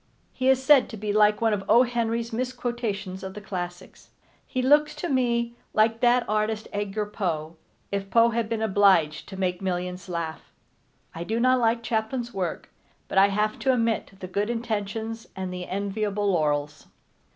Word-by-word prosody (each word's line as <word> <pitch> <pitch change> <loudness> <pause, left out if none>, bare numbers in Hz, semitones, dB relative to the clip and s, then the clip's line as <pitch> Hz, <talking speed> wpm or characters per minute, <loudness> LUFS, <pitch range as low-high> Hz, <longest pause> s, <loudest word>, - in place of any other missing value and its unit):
He 260 0 +1
is 265 0 +3
said 275 -3 +6
to 220 - -7
be 205 0 -2
like 210 0 +4
one 225 -1 +3
of 200 -2 -2
O. 235 +4 +7
Henry's 235 -1 -2
misquotations 235 -6 -3
of 190 0 -7
the - - -5
classics. 180 -2 -7 0.4
He 255 - -3
looks 295 +3 +4
to 350 - -4
me 235 -3 +1 0.2
like 225 +1 +3
that 245 0 +3
artist 215 +1 -1
Edgar 205 +1 -2
Poe, 170 -6 -3 0.4
if 200 -1 -3
Poe 230 +2 +5
had 230 -1 -1
been 225 -1 -1
obliged 190 -7 +3
to 190 - -8
make 180 -1 -1
millions 180 0 -3
laugh. 170 -2 -5 0.6
I 165 - -5
do 220 +6 -2
not 255 +1 +4
like 230 0 +1
Chaplin's 230 +2 -2
work, 180 -4 -4 0.4
but 195 - +2
I 195 - +7
have 210 +2 -1
to 265 - +2
admit 230 -4 0
the 185 - -6
good 200 +4 -1
intentions 225 -1 -3
and 185 -1 -4
the 180 0 -6
enviable 205 +1 -1
laurels. 150 -4 -1
215 Hz, 175 wpm, -26 LUFS, 190-235 Hz, 0.6 s, O